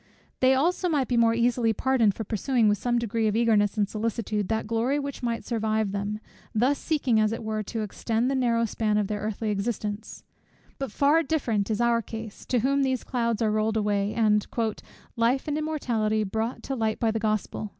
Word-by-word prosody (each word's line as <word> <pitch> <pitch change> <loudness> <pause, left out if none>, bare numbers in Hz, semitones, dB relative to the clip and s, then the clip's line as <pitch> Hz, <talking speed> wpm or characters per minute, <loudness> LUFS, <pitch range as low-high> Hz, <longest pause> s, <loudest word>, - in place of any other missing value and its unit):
They 260 0 +5
also 350 +6 +1
might 285 -6 +1
be 245 - 0
more 230 -1 +4
easily 235 -1 +2
pardoned 230 -4 +2
for 225 - -4
pursuing 225 +2 +1
with 205 -1 +2
some 240 -1 0
degree 230 -1 0
of 210 - 0
eagerness 220 -2 +2
and 205 -1 +2
solicitude 215 -1 -2
that 220 0 -1
glory 230 +5 0
which 280 -1 -4
might 235 -2 -2
survive 220 -3 0
them, 205 +1 -3 0.4
thus 255 +6 +2
seeking 275 -8 +1
as 215 0 +2
it 225 - -4
were 215 0 -2
to 225 +3 -4
extend 225 +3 -1
the 270 - +1
narrow 235 -3 +2
span 215 -1 0
of 210 - +1
their 210 +1 -3
earthly 215 +1 -2
existence: 210 0 -4 0.6
but 270 -5 -3
far 290 +7 +3
different 240 -10 -1
is 215 - -1
our 235 -1 +3
case, 220 -1 -8
to 245 -3 +1
whom 275 +3 +2
these 260 -2 0
clouds 235 -3 -1
are 215 - +2
rolled 215 +1 +1
away, 205 0 0
and 210 -2 +2 0.7
"life 240 +5 +1
and 295 - -1
immortality 230 -9 0
brought 220 +4 -3
to 270 - -3
light 220 -3 -1
by 225 -2 +2
the 225 - -2
Gospel." 215 -1 -2
225 Hz, 200 wpm, -26 LUFS, 215-245 Hz, 0.7 s, They